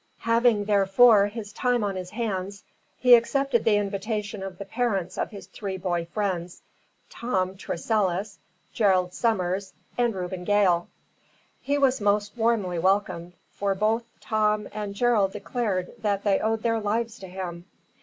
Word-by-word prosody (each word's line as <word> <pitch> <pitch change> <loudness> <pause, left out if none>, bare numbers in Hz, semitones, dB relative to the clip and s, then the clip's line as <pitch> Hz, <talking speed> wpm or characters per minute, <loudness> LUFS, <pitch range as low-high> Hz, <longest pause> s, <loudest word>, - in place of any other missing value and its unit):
Having, 230 -2 +3
therefore, 205 +1 +5
his 210 -1 -7
time 245 -1 +1
on 200 -2 -1
his 180 -1 -5
hands, 200 -3 -4 0.3
he 250 -1 +6
accepted 240 0 +3
the 220 -2 +4
invitation 205 +1 -2
of 190 -2 -6
the 200 - -7
parents 200 -5 -1
of - - -2
his 200 -3 -10
three 195 -3 -6
boy 175 -2 -2
friends, 180 -2 -3 0.5
Tom 190 -6 -1
Tressilis, 195 +1 -1 0.3
Gerald 185 -4 +2
Summers, 190 -4 -1 0.3
and 240 -3 +2
Reuben 180 0 -4
Gail. 185 -3 +3 0.7
He 285 +1 0
was 265 -4 +2
most 205 +1 +1
warmly 220 -7 +1
welcomed, 185 -2 0 0.2
for 200 -1 -1
both 220 +4 +1
Tom 215 -1 0
and 205 -2 -5
Gerald 210 -4 +2
declared 200 -3 -2
that 205 -3 -1
they 200 -2 +2
owed 220 0 -1
their 230 -1 +1
lives 225 +2 -2
to 190 - -9
him. 180 -2 -6
205 Hz, 145 wpm, -26 LUFS, 190-225 Hz, 0.7 s, he